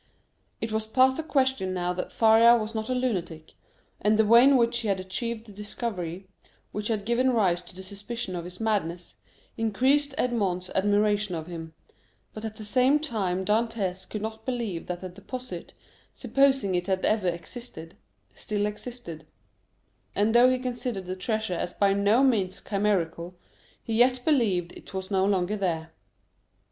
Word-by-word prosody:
It 225 - -3
was 220 0 -2
past 260 +4 +3
a - - -1
question 265 -11 0
now 180 0 -1
that 180 0 -5
Faria 230 +1 +6
was 220 0 -4
not 220 +1 -3
a 255 - +1
lunatic, 175 -11 -3 0.5
and 210 +1 +3
the 220 - +4
way 235 +3 +7
in 275 0 +6
which 235 0 +2
he 230 - -3
had 195 -2 +1
achieved 220 +5 -4
the 215 - -13
discovery, 195 -3 -5 0.4
which 210 0 -3
had 215 -3 -1
given 240 +3 +2
rise 185 -6 +2
to 180 - -15
the 190 - -9
suspicion 200 +1 -5
of 170 -1 -5
his 180 +1 -9
madness, 180 -6 -1 0.4
increased 265 +6 +1
Edmond's 195 - 0
admiration 205 0 +2
of 160 -1 -5
him; 165 -2 -8 0.6
but 215 - -8
at 220 -1 -5
the 215 - -8
same 255 +6 +4
time 200 -11 -2
Dantès 210 -4 -1
could 215 -1 -5
not 220 0 -5
believe 230 -9 -3
that 175 -1 -4
the 185 - -6
deposit, 250 +7 -8 0.4
supposing 270 -8 +2
it 180 +1 -1
had 190 -1 0
ever 215 -3 +2
existed, 170 -1 -6 0.4
still 205 -1 -2
existed; 210 -6 -6 0.9
and 210 +2 +2
though 245 +1 +7
he 255 - +2
considered 245 -5 -4
the 185 +1 -4
treasure 215 +1 -2
as 175 +1 -3
by 200 -1 +3
no 205 +6 +3
means 200 -8 +1
chimerical, 180 -4 -1 0.5
he 225 - -4
yet 250 0 +3
believed 205 - +2
it - - -12
was 190 +1 -4
no 190 -1 +3
longer 195 0 +1
there. 165 -5 -2
210 Hz, 170 wpm, -27 LUFS, 185-235 Hz, 0.9 s, way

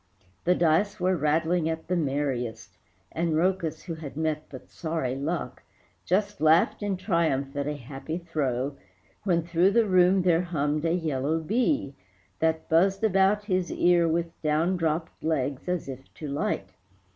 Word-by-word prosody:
The 180 +1 +4
dice 180 +6 +2
were 185 +1 +2
rattling 160 +2 +1
at 160 0 -4
the 180 - 0
merriest, 135 -7 -2 0.3
And 165 0 -1
Rhœcus, 165 -1 0
who 170 - -5
had 155 -3 -8
met 155 -1 -2
but 130 - -11
sorry 160 -6 -2
luck, 155 +5 -3 0.4
Just 200 +1 0
laughed 160 +6 +4
in 205 -2 -1
triumph 165 -8 0
at 140 0 -2
a 150 - -2
happy 135 +5 -6
throw, 140 -5 -2 0.5
When 170 -4 +2
through 170 +2 +3
the 230 0 +4
room 185 -1 +4
there 175 -2 +3
hummed 155 -3 -1
a 165 - +2
yellow 155 -2 -1
bee 225 - 0 0.5
That 160 0 0
buzzed 190 +5 +3
about 200 0 +3
his 185 -3 0
ear 175 -1 +3
with 165 +1 -2
down 155 +4 +1
dropped 165 -1 -2
legs 145 -1 -1
As 180 -5 -1
if 135 -1 -9
to 155 - -7
light. 140 -8 -2
165 Hz, 155 wpm, -27 LUFS, 150-180 Hz, 0.5 s, The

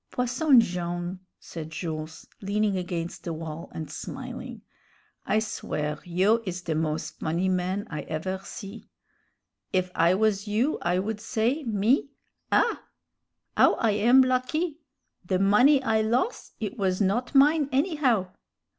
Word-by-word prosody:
"Posson 255 +2 +3
Jone'," 175 -1 -3 0.2
said 160 -2 -8
Jules, 160 -1 -6 0.2
leaning 205 0 0
against 175 -2 -4
the 170 - -3
wall 160 0 -7
and 160 -1 -6
smiling, - - -7 0.6
"I 215 - +2
swear 150 -8 -2
you 190 +6 +2
is 180 -3 -5
the 165 - -1
moz 155 0 -2
funny 170 +4 0
man 185 +2 -1
I 150 - -5
ever 185 +5 -3
see. 200 +2 -9 0.8
If 185 -1 0
I 170 +2 +3
was 210 0 +1
you 230 +9 +1
I 175 +1 +1
would 210 +3 -2
say, 230 +7 0
me, 225 +6 +2 0.4
'Ah! - - +2 0.7
'ow - - +5
I 225 -3 +1
am 235 +6 +5
lucky! 260 +6 0 0.4
the 185 +1 0
money 245 +9 +5
I 220 -3 +2
los', 240 - -1
it 220 +4 -4
was 185 -2 +1
not 220 +7 0
mine, 290 +1 +5
anyhow!' 265 - +1
200 Hz, 135 wpm, -26 LUFS, 175-240 Hz, 0.8 s, ow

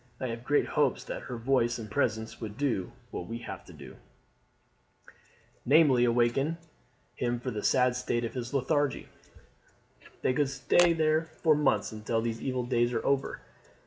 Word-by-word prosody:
I 130 - -3
have 115 +1 -5
great 145 +3 +2
hopes - - +1
that - - -6
her 125 - -6
voice 120 -1 +1
and 110 -2 -7
presence 110 0 -2
would 110 -1 -6
do 125 -10 -1 0.2
what 90 - -5
we 115 - -4
have - - -7
to - - -13
do, - - -12 1.7
namely, 135 -3 +5
awaken 120 +6 +1 0.6
him 120 -1 -1
from 125 0 -4
his 105 - 0
sad 125 -1 +3
state 120 -1 -1
of 115 - -6 0.2
lethargy. 140 +1 0 1.1
They - - +2
could 145 0 +1
stay 170 +6 +3
there 155 0 +2 0.2
for 160 -2 +6
months 135 -9 +1
until 110 +1 -2
these 115 0 -3
evil 130 -2 -2
days 120 -1 +1
are 115 - -2
over. 140 -1 0
125 Hz, 160 wpm, -29 LUFS, 115-140 Hz, 1.7 s, for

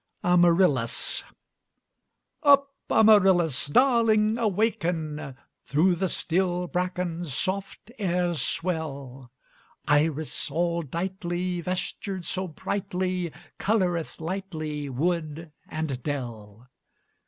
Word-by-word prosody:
AMARYLLIS 175 -8 +3 1.2
Up, 280 -1 +5 0.2
Amarylis! 190 - +5
Darling, 225 - +4
awaken! 165 - -1 0.3
Through 165 +6 +3
the 185 +2 -1
still 180 +1 0
bracken 180 -1 -2
Soft 190 - -3
airs 175 -4 0
swell; 140 -7 -3 0.6
Iris, 150 +1 +1
all 170 0 0
dightly, 175 +2 -3
Vestured 185 +1 -4
so 185 +3 -2
brightly, 180 +1 -2 0.3
Coloreth 175 - 0
lightly 160 -5 -4
Wood 160 +2 -2 0.2
and 155 -5 -3
dell. 115 -5 -6
175 Hz, 80 wpm, -26 LUFS, 155-190 Hz, 1.2 s, Up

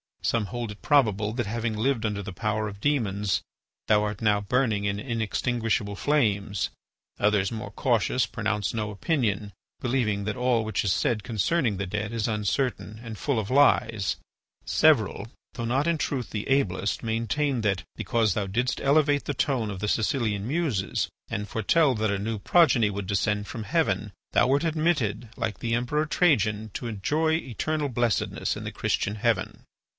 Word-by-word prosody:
Some 115 -3 +1
hold 120 -2 -4
it 105 - -12
probable 110 -7 +2
that, 120 -1 -1
having 115 +1 -2
lived 115 0 +1
under 105 -1 -2
the 95 -1 -6
power 110 +1 -1
of 100 -1 -8
demons, 105 -7 0 0.5
thou 105 -1 +4
art 105 0 -3
now 105 -2 +3
burning 110 -1 +1
in 100 0 -1
inextinguishable 115 -2 -1
flames; 105 -7 +1 0.5
others, 105 -1 +2
more 110 -3 -5
cautious, 120 +1 +1
pronounce 110 -2 -2
no 105 -2 -2
opinion, 105 - -1 0.3
believing 120 -5 0
that 110 +3 -2
all 125 -2 +2
which 110 -2 -1
is 100 -2 +2
said 110 -4 0
concerning 115 - 0
the 100 - -2
dead 105 +3 -3
is 115 -2 -1
uncertain 110 +1 -1
and 115 -2 -7
full 140 -1 0
of 105 -1 -4
lies; 115 -7 +3 0.5
several, 115 -9 +3 0.3
though 115 - -4
not 130 +5 +1
in 170 -1 +2
truth 135 -5 -2
the 105 -1 -4
ablest, 105 -8 0
maintain 115 +4 0
that, 100 -3 0
because 110 -4 +1
thou 100 0 -1
didst 120 +6 -1
elevate 145 0 +3
the 145 - -1
tone 130 -5 0
of 100 -2 -5
the 105 - -2
Sicilian 110 -2 0
Muses 140 - -1 0.2
and 105 +1 -3
foretell 135 +8 +2
that 110 -1 0
a 100 - -1
new 110 +1 -3
progeny 130 - +4
would 100 -1 -4
descend 105 +1 0
from 115 -3 -5
heaven, 105 - 0 0.2
thou - - +4
wert 140 +4 +2
admitted, 150 -9 0
like 105 -5 -3
the 115 0 0
Emperor 135 +6 0
Trajan, 110 - +2
to 120 - -4
enjoy 150 +10 0
eternal 155 - -1
blessedness 120 -3 0
in - - -6
the - - -4
Christian 100 - -1
heaven." 105 - -1
110 Hz, 170 wpm, -26 LUFS, 105-130 Hz, 0.5 s, thou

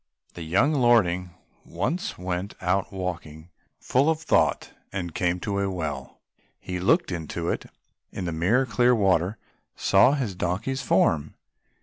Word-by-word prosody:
The 85 - -9
young 100 - +2
lordling 110 -9 +3 0.3
once 160 - -3
went 90 +2 -4
out 95 +2 0
walking 85 -4 -6 0.3
full 135 +5 +2
of 160 -1 +1
thought 160 - +1 0.2
and 90 -4 -4
came 90 0 0
to 100 -1 -2
a 100 0 0
well, 75 -8 -5 0.4
he 90 0 -5
looked 95 +1 +2
into 85 0 -4
it - - -2
and - - -17 0.4
in 95 - -5
the 85 - -2
mirror 95 +12 +2
clear 125 0 +3
water 95 -1 +2 0.4
saw 135 - +4
his 130 -9 -2
donkey's 90 +10 -2
form. 75 -2 +1
90 Hz, 145 wpm, -25 LUFS, 85-120 Hz, 0.4 s, saw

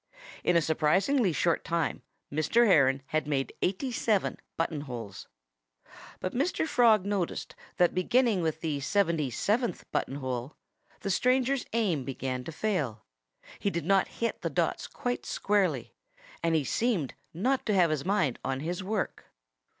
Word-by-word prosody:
In 175 - +3
a 170 - +4
surprisingly 190 - +2
short 170 +1 +1
time 165 -1 -1 0.3
Mr. 195 +11 +3
Heron 140 - +4
had 155 -2 0
made 135 -2 -1
eighty 200 +8 0
seven 220 -4 0 0.2
button 165 -2 -1
holes. 120 -8 -7 0.9
But 185 - -3
Mr. 305 +6 0
Frog 225 -8 +4
noticed 200 -4 -2 0.2
that 175 -1 +4
beginning 215 +2 +2
with 160 -1 -1
the 155 -4 -1
seventy 165 -2 +1
seventh 220 - 0
button 135 - -1
hole 130 0 -4 0.5
the 195 - -1
stranger's 255 +5 +2
aim 195 - +1
began 130 -1 -3
to - - -5
fail. 150 - -2 0.5
He 200 - +1
did 170 -5 -3
not 195 +1 +3
hit 230 - -3
the - - -1
dots - - -1
quite 245 0 -3
squarely. 205 -2 0 0.5
And 165 -1 +2
he 155 - +2
seemed 190 - 0 0.2
not 250 +11 0
to 210 - +2
have 175 -4 +4
his 150 -3 -1
mind 180 - +1
on 135 0 -2
his 175 +4 -3
work. 205 +1 -2
175 Hz, 150 wpm, -29 LUFS, 150-215 Hz, 0.9 s, a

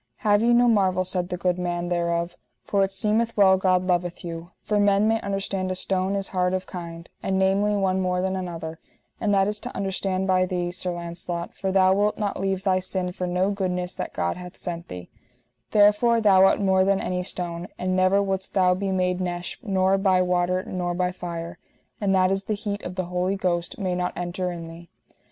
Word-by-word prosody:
Have 205 0 +4
ye 235 +1 +3
no 240 +1 +5
marvel, 190 -5 +3
said 180 -1 -1
the 180 - -3
good 180 0 0
man 175 0 -2
thereof, 170 0 -1 0.3
for 200 -1 +1
it 195 - -1
seemeth 220 +4 +1
well 190 -2 +6
God 185 -1 +2
loveth 175 -1 -1
you; 165 0 -6
for 210 -1 0
men 205 +1 +3
may 225 0 +1
understand 195 -1 -2
a 185 - -1
stone 190 +1 0
is 195 -1 -2
hard 180 0 0
of 185 - -3
kind, 170 -2 -8
and 190 0 -1
namely 195 +2 +2
one 190 -1 +1
more 180 -1 0
than 190 +1 -1
another; 165 -3 -5 0.4
and 215 -3 0
that 195 -1 +3
is 210 0 -2
to - - -7
understand 190 -1 -1
by 185 -1 +3
thee, 175 -1 -2
Sir 180 0 -2
Launcelot, 170 0 -4
for 190 -1 -3
thou 190 0 +4
wilt 205 +2 +1
not 205 -2 -2
leave 190 -1 -1
thy 185 -1 +2
sin 185 0 -2
for 180 0 -4
no 180 +3 +1
goodness 180 -2 -2
that - - -5
God 85 - -2
hath 180 0 -10
sent 170 -1 -5
thee; 90 -1 -9 0.6
therefore 210 +3 +4
thou 195 -3 +6
art - - +3
more 190 -2 +3
than 195 0 +2
any 180 0 -2
stone, 175 -1 -4
and 185 0 -1
never 185 +2 +3
wouldst 190 -1 -2
thou 185 -2 +4
be 195 +2 -2
made 180 -1 0
nesh 175 -1 -4
nor 195 -4 +2
by 190 -2 +3
water 180 0 +1
nor 175 -1 -3
by 180 0 0
fire, 170 -2 -6 0.4
and 195 -1 +2
that 185 0 +3
is 195 0 -1
the 215 - -1
heat 205 -1 -4
of 180 - -6
the 185 -1 -2
Holy 180 +2 -1
Ghost 175 -3 -2
may 185 -3 -1
not 180 0 -1
enter 180 +1 -3
in 170 -1 -7
thee. 165 +1 -12
185 Hz, 215 wpm, -24 LUFS, 180-195 Hz, 0.6 s, well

